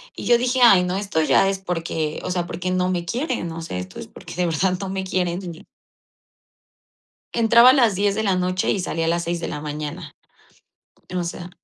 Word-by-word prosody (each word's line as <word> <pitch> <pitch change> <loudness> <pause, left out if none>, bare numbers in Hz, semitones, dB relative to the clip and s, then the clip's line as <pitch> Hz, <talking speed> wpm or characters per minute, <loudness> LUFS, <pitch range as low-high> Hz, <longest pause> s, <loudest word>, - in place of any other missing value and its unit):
Y - - -7
yo 240 - +5
dije: 250 +1 0
"Ay, 195 -6 +7
no, 180 0 -2
esto 195 -5 -1
ya 175 +4 +3
es 195 -1 -2
porque, 165 -4 -3
o 185 - -3
sea, 175 -1 -2
porque 185 +1 -4
no 185 0 +1
me 175 -2 -2
quieren, 245 - -2
no 165 0 -6
sé, 160 - -5
esto 90 0 -8
es - - -8
porque - - -11
de 180 +1 0
verdad 180 +3 0
no 195 - -4
me 190 0 -3
quieren". 180 -2 -1 2.0
Entraba 235 +2 +7
a - - +3
las 235 -7 +3
10 200 +1 +1
de 220 - -1
la 195 -3 +1
noche 185 0 0
y 200 - +1
salía 165 -2 -2
a - - +1
las 170 +1 0
6 170 0 -2
de - - -4
la 150 - -5
mañana 150 +1 -6 1.0
o 180 - 0
sea. 175 +1 -6
180 Hz, 215 wpm, -22 LUFS, 170-195 Hz, 2.0 s, Ay